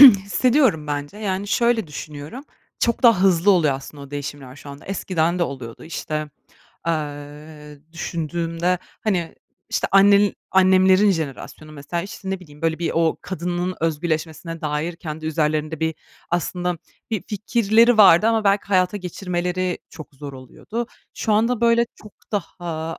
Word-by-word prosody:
hissediyorum 235 - +6
bence, 145 +4 -4
yani, 200 -1 -2
şöyle 235 -3 +2
düşünüyorum; 150 - -8 0.3
çok 235 - 0
daha 230 -7 +6
hızlı 190 0 +4
oluyor 160 -8 +4
aslında 140 +2 -9
o 140 - -11
değişimler 145 -2 -6
şu 140 +1 -10
anda. 140 +1 -11
Eskiden 180 -3 0
de - - +1
oluyordu, 130 -7 -5
işte, 155 -2 -4 0.6
eee, 150 -1 -5
düşündüğümde, 170 +1 -2 0.2
hani, 180 -6 -1 0.3
işte, - - -1
annenl 200 +1 +6 0.2
annemlerin 190 +1 +5
jenerasyonu 155 -1 -5
mesela, 150 +4 -4
işte, 190 0 -7
ne 190 - -3
bileyim, 150 -3 -15
böyle, 160 -1 +1
bir, 170 - -1
o 165 -1 +2
kadının 180 0 -3
özgürleşmesine 165 +1 -2
dair 155 +3 -2
kendi 155 -2 -6
üzerlerinde 155 0 -1
bir 160 0 0 0.4
aslında 175 0 -1 0.3
bir 215 -5 -1
fikirleri 220 +2 +3
vardı 195 0 +8
ama 225 -2 +2
belki 200 +1 +3
hayata 185 0 +2
geçirmeleri 180 -1 -2
çok 155 -3 -11
zor 140 +1 -8
oluyordu. 210 - -6 0.3
Şu 220 - -1
anda 230 +2 +2
böyle 235 0 +4
çok 210 - -15 0.2
daha, 165 -5 -4
175 Hz, 140 wpm, -22 LUFS, 155-200 Hz, 0.6 s, vardı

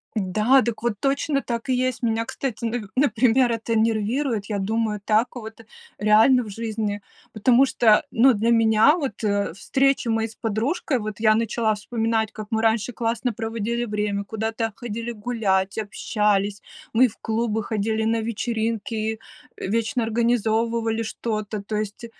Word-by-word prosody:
Да, 215 +6 +3
так 235 -3 -3
вот 235 -2 +1
точно, 275 +1 0
так 235 +1 -4
и 255 - +3
есть! 255 -1 -1
Меня, 230 -1 0
кстати, 235 -2 -4
на 230 -2 -3
например, 250 -1 +3
это 230 0 -2
нервирует, 225 +1 0
я 205 - -1
думаю 215 +1 -1
так, 220 +4 +1
вот 225 -1 -8 0.4
реально 220 +5 +5
в 215 - -9
жизни, 215 -1 -3 0.3
потому 245 +5 +4
что 220 -5 +4
ну 255 +3 +5
для 225 +2 0
меня 225 +4 +5
вот 280 -10 -3 0.4
встречи 275 +3 +1
мои 225 0 +1
с 220 - -14
подружкой, 240 - -1
вот 215 -1 -6
я 215 -1 +4
начала 225 -1 0
вспоминать, 225 0 -1
как 215 -1 -8
мы 220 0 0
раньше 225 +1 +1
классно 235 +1 -1
проводили 230 +2 -2
время, 210 -2 -2
куда-то 220 +1 -3
ходили 235 0 -5
гулять, 205 -4 -1
общались, 205 -1 0 0.3
мы 250 +3 +6
и - - +3
в 225 - -12
клубы 225 -1 -1
ходили, 220 +1 -1
и - - 0
на 225 0 +1
вечеринки, 225 0 -2
и 220 0 -2 0.5
вечно 230 +4 0
организовывали 230 0 0
что-то. 215 -2 -4
То 210 +2 -5
есть 215 +2 -4
225 Hz, 155 wpm, -23 LUFS, 215-235 Hz, 0.5 s, мы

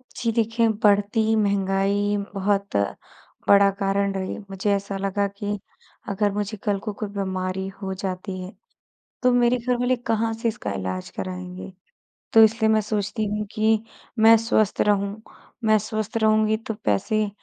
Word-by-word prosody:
जी, 230 -2 -1
देखें 225 0 +2
बढ़ती 210 +2 +3
महँगाई 200 0 +1 0.2
बहुत 200 0 -1 0.7
बड़ा 200 0 +7
कारण 195 0 +1
रही, 190 -1 -3
मुझे 195 +1 -1
ऐसा 200 0 -2
लगा 200 +1 0
कि, 205 +1 -4 0.5
अगर 205 +1 +1
मुझे 210 +1 -3
कल 205 -2 0
को 210 +1 -5
कोई 210 +1 -5
बीमारी 190 -1 -3
हो 190 -1 -3
जाती 185 0 -5
है, 185 +1 -7 0.7
तो 250 -1 +4
मेरे 245 0 +3
घरवाले 245 +1 +1
कहाँ 230 -2 -1
से 225 +1 -1
इसका 105 - -3
इलाज 95 -1 -4
कराएँगे। 185 +1 -6 0.6
तो 225 - +9
इसलिए 220 0 +3
मैं 215 0 +3
सोचती 210 +1 -2
हूँ, 210 +1 -2
कि 220 0 +2 0.4
मैं 225 +1 +8
स्वस्थ 220 -2 +1
रहूँ, 205 +1 +1 0.4
मैं 215 -1 +5
स्वस्थ 215 +1 -3
रहूँगी, 215 0 +3
तो 225 0 -5
पैसे 210 - +1
205 Hz, 150 wpm, -24 LUFS, 195-220 Hz, 0.7 s, तो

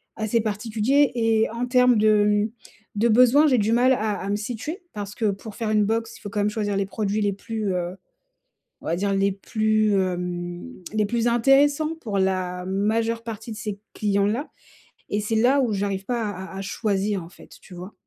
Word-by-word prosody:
assez 220 +1 0
particulier 225 +6 +1
et 225 -1 +2
en 235 +2 -2
termes 250 -1 +4
de, 215 0 +4
hem, 210 +1 +1 0.4
de 215 +3 +2
besoins, 255 +6 +6
j'ai 260 -4 +3
du 215 +2 +1
mal 250 +2 +4
à 215 -4 -1
à 195 - -4
me 205 - +1
situer. 245 - -5
Parce 205 -1 -6
que 220 - 0
pour 200 +2 -9
faire 220 -2 -2
une 210 -1 +3
box, 225 +1 -2
il - - -19
faut 205 - -6
quand 205 +1 -1
même 205 - +2
choisir 205 -2 -1
les 200 - 0
produits 210 0 -2
les 205 -1 +1
plus, 215 -1 -3
heu, 180 0 -3 0.9
on - - -11
va 165 - 0
dire, 200 +2 0
les 195 0 +2
plus, 215 +2 +1
hem, 180 -2 -2 0.3
les 215 -1 +2
plus 235 +2 0
intéressants 280 +6 +3
pour 210 -7 -3
la 185 -1 -1
majeure 225 +4 0
partie 225 0 -6
de - - -8
ces 210 -2 -5 0.2
clients-là 210 +6 0 0.6
et 205 - 0
c'est 215 +2 -1
là, 250 +5 +4
où 235 - 0
j'arrive 195 -1 -2
pas 245 -1 -1
à 190 -2 -6
à - - -6
à 195 - -4
choisir, 200 -1 -1
en - - -11
fait, - - -17
tu 180 - -14
vois? 180 +4 -9
215 Hz, 205 wpm, -24 LUFS, 200-230 Hz, 0.9 s, besoins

